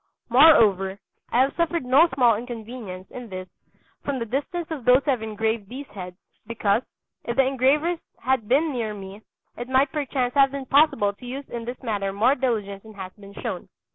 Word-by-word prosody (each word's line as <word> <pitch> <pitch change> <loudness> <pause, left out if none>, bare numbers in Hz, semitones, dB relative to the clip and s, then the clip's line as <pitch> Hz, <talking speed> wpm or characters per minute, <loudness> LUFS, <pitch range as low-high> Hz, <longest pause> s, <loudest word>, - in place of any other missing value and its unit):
Moreover, 210 - +5 0.3
I 245 - +4
have 270 +2 +1
suffered 335 -4 0
no 275 +7 +5
small 240 -4 +4
inconvenience 225 -4 -7
in 245 -2 -8
this 185 -1 -6 0.6
from 280 -2 -2
the 235 - -3
distance 285 +8 -3
of 295 -6 -4
those 250 +3 +5
who 290 - +3
have 250 -4 -1
engraved 220 -1 -2
these 270 +3 -7
heads, 180 -3 -8 0.3
because, 220 -1 +1 0.4
if 235 - -2
the 270 0 +4
engravers 280 +6 +2 0.2
had 255 -3 0
been 295 +5 +2
near 220 -4 -3
me, 195 +1 -9 0.4
it 240 +1 -6
might 265 +1 +3
perchance 265 -4 -1
have 275 -1 +5
been 275 0 -6
possible 275 -8 +3
to 245 - -14
use 270 +3 -6
in 235 -1 -5
this 245 +2 -7
matter 205 -4 -1
more 220 +7 +3
diligence 215 -7 -2
than 220 0 -14
has 185 -2 -8
been 200 -1 -14
shown. - - -4
245 Hz, 190 wpm, -24 LUFS, 210-270 Hz, 0.6 s, Moreover